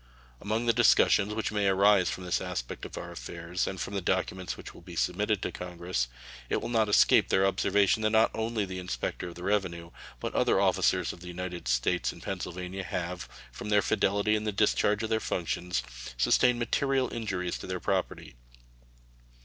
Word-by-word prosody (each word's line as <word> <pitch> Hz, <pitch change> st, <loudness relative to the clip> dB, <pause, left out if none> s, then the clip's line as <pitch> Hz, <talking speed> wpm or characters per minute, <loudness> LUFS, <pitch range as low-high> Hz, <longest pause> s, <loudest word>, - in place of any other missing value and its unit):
Among 110 Hz, +3 st, -1 dB
the 115 Hz, -, +4 dB
discussions 105 Hz, -3 st, +4 dB
which 110 Hz, -, -2 dB
may 105 Hz, -1 st, +1 dB
arise 95 Hz, 0 st, +4 dB
from 90 Hz, -, -5 dB
this 90 Hz, -, 0 dB
aspect -, -, -5 dB
of -, -, -8 dB
our -, -, -6 dB
affairs, 85 Hz, +1 st, -4 dB
and 95 Hz, -, -4 dB
from 100 Hz, -, -4 dB
the 100 Hz, -, -1 dB
documents 95 Hz, 0 st, -1 dB
which -, -, -10 dB
will -, -, -14 dB
be -, -, -11 dB
submitted 105 Hz, +2 st, 0 dB
to -, -, -2 dB
Congress, 90 Hz, -7 st, -3 dB, 0.4 s
it -, -, +1 dB
will 115 Hz, -, -5 dB
not 110 Hz, -3 st, +2 dB
escape 105 Hz, -, +5 dB
their 95 Hz, 0 st, +3 dB
observation 100 Hz, +2 st, +2 dB
that 110 Hz, -, +2 dB
not 110 Hz, +1 st, +4 dB
only 110 Hz, -1 st, -1 dB
the 95 Hz, -1 st, -6 dB
inspector 90 Hz, 0 st, -4 dB
of 85 Hz, -, -9 dB
the 90 Hz, -, -9 dB
revenue, 90 Hz, -4 st, -1 dB, 0.3 s
but -, -, -4 dB
other -, -, +3 dB
officers -, -, +2 dB
of -, -, -13 dB
the 90 Hz, -, -11 dB
United 90 Hz, -4 st, -6 dB
States -, -, +1 dB
in -, -, -13 dB
Pennsylvania 90 Hz, +2 st, -5 dB
have, 90 Hz, 0 st, -4 dB, 0.2 s
from 60 Hz, +12 st, -7 dB
their 105 Hz, -1 st, +4 dB
fidelity 100 Hz, +2 st, +2 dB
in 105 Hz, -, -1 dB
the 110 Hz, -, -1 dB
discharge 105 Hz, +1 st, +2 dB
of 110 Hz, -, -3 dB
their 110 Hz, -, +2 dB
functions, 85 Hz, -, -2 dB, 0.3 s
sustained 120 Hz, -, +4 dB
material 130 Hz, +2 st, 0 dB
injuries 95 Hz, -6 st, -3 dB
to -, -, -8 dB
their 95 Hz, 0 st, -3 dB
property. 95 Hz, 0 st, -2 dB
95 Hz, 190 wpm, -29 LUFS, 90-105 Hz, 0.4 s, escape